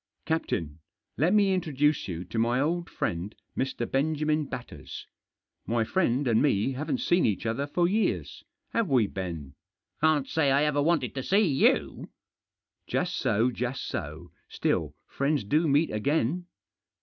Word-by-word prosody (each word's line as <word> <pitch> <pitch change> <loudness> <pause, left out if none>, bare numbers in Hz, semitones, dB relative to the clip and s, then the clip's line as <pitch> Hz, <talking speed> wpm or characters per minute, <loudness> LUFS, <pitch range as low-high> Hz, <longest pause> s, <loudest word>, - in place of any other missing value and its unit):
Captain, 85 - -2 0.4
let 160 +7 +2
me 200 -2 +4
introduce 150 -5 +1
you 90 -2 -4
to 105 +5 -4
my 120 +2 +2
old 170 +4 0
friend, 90 +5 -3 0.2
Mr. 130 -2 -2
Benjamin 150 +2 0
Batters. 120 - -8 0.6
My 115 0 +1
friend 135 -1 +1
and 115 -2 +3
me 130 -4 +2
haven't 155 - -2
seen 175 -6 +3
each 105 +1 0
other 115 +6 -1
for 170 +4 +1
years, 210 +4 -1 0.3
have 230 -6 0
we, 125 -5 +4
Ben? 85 -8 -5 0.2
" - - -63
" - - -44
Can't 155 -3 +3
say 160 -4 +1
I 140 +2 +4
ever 150 -1 +2
wanted 150 -4 +1
to 135 - -3
see 200 +10 +3
you." 140 -6 +1 0.4
" - - -64 0.3
Just - - -1
so, 115 +5 +1
just 125 +2 -3
so; 80 +4 -6 0.2
still - - -1
friends 140 -1 0
do 155 +11 +2
meet 145 +3 +3
again. 145 +9 0
140 Hz, 160 wpm, -28 LUFS, 115-160 Hz, 0.6 s, me